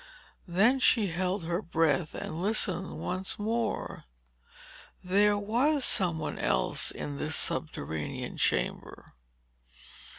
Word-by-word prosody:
Then 215 Hz, +10 st, +3 dB
she 225 Hz, -5 st, +3 dB
held 180 Hz, +2 st, -1 dB
her 170 Hz, +3 st, -1 dB
breath 160 Hz, -5 st, +1 dB
and 160 Hz, +2 st, -5 dB
listened 190 Hz, -2 st, -1 dB
once 185 Hz, +1 st, -2 dB
more. 225 Hz, +3 st, -2 dB, 1.0 s
There 205 Hz, +3 st, +3 dB
was 250 Hz, +8 st, +1 dB
some 175 Hz, -6 st, +2 dB
one 155 Hz, -, -4 dB
else -, -, +1 dB
in 75 Hz, -1 st, -5 dB
this -, -, 0 dB
subterranean 80 Hz, -1 st, -2 dB
chamber. -, -, -1 dB
185 Hz, 105 wpm, -29 LUFS, 165-215 Hz, 1.0 s, Then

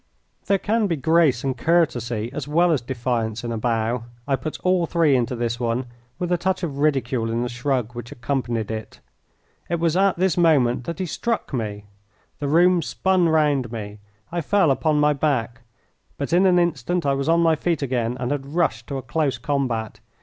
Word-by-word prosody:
There 200 Hz, -, +3 dB
can 215 Hz, +2 st, 0 dB
be 170 Hz, -, 0 dB
grace 155 Hz, -3 st, +2 dB
and 135 Hz, -2 st, -1 dB
courtesy 120 Hz, -7 st, 0 dB
as 145 Hz, -1 st, -5 dB
well 170 Hz, +4 st, +3 dB
as 145 Hz, -6 st, +1 dB
defiance 120 Hz, -3 st, -2 dB
in 120 Hz, -, -3 dB
a 115 Hz, -, -2 dB
bow; 115 Hz, +1 st, -1 dB, 0.2 s
I 140 Hz, -, +2 dB
put 155 Hz, +3 st, -6 dB
all 180 Hz, -2 st, +2 dB
three 165 Hz, -5 st, +3 dB
into 125 Hz, 0 st, 0 dB
this 120 Hz, 0 st, -2 dB
one, 120 Hz, +1 st, -1 dB, 0.3 s
with 180 Hz, 0 st, -3 dB
a 175 Hz, -, +2 dB
touch 185 Hz, +1 st, -1 dB
of 145 Hz, -5 st, -3 dB
ridicule 130 Hz, -6 st, +1 dB
in 115 Hz, +1 st, -1 dB
the 125 Hz, -, -3 dB
shrug 120 Hz, -1 st, -2 dB
which 120 Hz, +1 st, -8 dB
accompanied 120 Hz, -4 st, -2 dB
it. 110 Hz, -1 st, -6 dB, 0.7 s
It 170 Hz, 0 st, 0 dB
was 165 Hz, -1 st, +1 dB
at 195 Hz, 0 st, +3 dB
this 185 Hz, -1 st, +1 dB
moment 130 Hz, -8 st, +3 dB
that 170 Hz, -, -4 dB
he 185 Hz, -, -2 dB
struck 230 Hz, +2 st, -3 dB
me. 105 Hz, -4 st, -3 dB, 0.5 s
The 145 Hz, -, -2 dB
room 175 Hz, +4 st, +4 dB
spun 185 Hz, 0 st, +1 dB
round 145 Hz, -6 st, +2 dB
me. 105 Hz, -2 st, -6 dB, 0.3 s
I 175 Hz, 0 st, -1 dB
fell 190 Hz, -3 st, +3 dB
upon 150 Hz, +2 st, +1 dB
my 150 Hz, 0 st, +4 dB
back. 130 Hz, -4 st, -1 dB, 0.6 s
But 140 Hz, +3 st, -3 dB
in 185 Hz, +2 st, +5 dB
an 180 Hz, -1 st, +4 dB
instant 175 Hz, 0 st, 0 dB
I 140 Hz, -, +2 dB
was 140 Hz, +3 st, -1 dB
on 165 Hz, +1 st, +4 dB
my 165 Hz, -1 st, +4 dB
feet 165 Hz, -1 st, -1 dB
again 125 Hz, -2 st, -1 dB
and 125 Hz, +1 st, -2 dB
had 140 Hz, +1 st, -4 dB
rushed 115 Hz, -10 st, 0 dB
to 140 Hz, -, -4 dB
a 130 Hz, -, -6 dB
close 140 Hz, +2 st, -1 dB
combat. 125 Hz, -6 st, -2 dB
140 Hz, 200 wpm, -23 LUFS, 120-170 Hz, 0.7 s, in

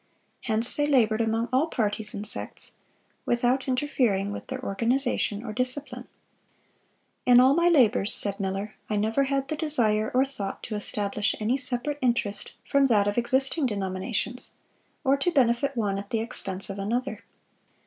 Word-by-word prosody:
Hence 225 Hz, +1 st, +1 dB
they 290 Hz, 0 st, +1 dB
labored 230 Hz, -6 st, +3 dB
among 225 Hz, +1 st, 0 dB
all 275 Hz, +5 st, +3 dB
parties 215 Hz, -6 st, -1 dB
and 205 Hz, -, -5 dB
sects, 215 Hz, -, -4 dB, 0.5 s
without 245 Hz, +3 st, +1 dB
interfering 250 Hz, -7 st, 0 dB
with -, -, -7 dB
their 260 Hz, 0 st, -5 dB
organization 230 Hz, 0 st, 0 dB
or 215 Hz, -, -5 dB
discipline."(618) 250 Hz, +1 st, -3 dB, 1.2 s
"In 245 Hz, -1 st, +8 dB
all 260 Hz, +2 st, +6 dB
my 340 Hz, +3 st, +4 dB
labors," 240 Hz, -, +4 dB
said 200 Hz, 0 st, +2 dB
Miller, 195 Hz, +2 st, -3 dB, 0.2 s
"I 215 Hz, -, 0 dB
never 220 Hz, +6 st, +1 dB
had 275 Hz, 0 st, -1 dB
the 310 Hz, -, -2 dB
desire 230 Hz, -9 st, +1 dB
or 260 Hz, +1 st, +4 dB
thought 235 Hz, -8 st, -6 dB
to 220 Hz, -, -4 dB
establish 205 Hz, 0 st, -1 dB
any 220 Hz, +4 st, +1 dB
separate 265 Hz, +2 st, -2 dB
interest 235 Hz, -5 st, -1 dB
from 280 Hz, -1 st, +4 dB
that 205 Hz, -5 st, +3 dB
of 205 Hz, +3 st, +1 dB
existing 265 Hz, +4 st, +1 dB
denominations, 200 Hz, +3 st, -2 dB, 0.5 s
or 275 Hz, -1 st, +3 dB
to 275 Hz, +6 st, +1 dB
benefit 265 Hz, -2 st, +2 dB
one 200 Hz, -3 st, 0 dB
at 200 Hz, 0 st, -9 dB
the 225 Hz, -, 0 dB
expense 195 Hz, -4 st, -3 dB
of 195 Hz, -, -7 dB
another. 240 Hz, +7 st, -2 dB
240 Hz, 160 wpm, -26 LUFS, 210-265 Hz, 1.2 s, In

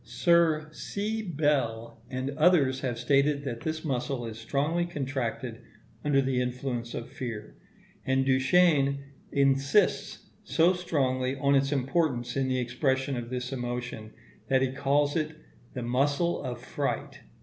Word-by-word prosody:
Sir 155 Hz, +5 st, +2 dB
C. 210 Hz, +7 st, -3 dB
Bell 140 Hz, -, -1 dB
and 130 Hz, +1 st, -3 dB
others 145 Hz, -4 st, +3 dB
have 125 Hz, -3 st, -2 dB
stated 140 Hz, +3 st, +2 dB
that 120 Hz, -4 st, -4 dB
this 160 Hz, 0 st, -3 dB
muscle 130 Hz, -2 st, -2 dB
is 110 Hz, -1 st, -7 dB
strongly 145 Hz, +9 st, 0 dB
contracted 130 Hz, -6 st, -3 dB, 0.4 s
under 140 Hz, -2 st, +3 dB
the 130 Hz, -1 st, +1 dB
influence 125 Hz, -1 st, -3 dB
of 115 Hz, -, -5 dB
fear; 115 Hz, -4 st, -6 dB, 0.5 s
and 135 Hz, 0 st, +1 dB
Duchenne 140 Hz, +1 st, +4 dB, 0.3 s
insists 140 Hz, +7 st, +2 dB
so 165 Hz, +7 st, +3 dB
strongly 135 Hz, -7 st, 0 dB
on 140 Hz, +1 st, +2 dB
its 135 Hz, 0 st, +3 dB
importance 135 Hz, -2 st, 0 dB
in 135 Hz, -1 st, +1 dB
the 130 Hz, 0 st, 0 dB
expression 130 Hz, +2 st, 0 dB
of 120 Hz, -1 st, -5 dB
this 125 Hz, +1 st, -4 dB
emotion, 120 Hz, -3 st, -4 dB, 0.4 s
that 130 Hz, -1 st, +3 dB
he 130 Hz, -, 0 dB
calls 140 Hz, +1 st, +1 dB
it 155 Hz, -1 st, -1 dB, 0.4 s
the 125 Hz, -, -3 dB
muscle 140 Hz, +8 st, +1 dB
of 125 Hz, -3 st, -5 dB
fright. 140 Hz, +2 st, -3 dB
135 Hz, 140 wpm, -28 LUFS, 125-150 Hz, 0.5 s, Duchenne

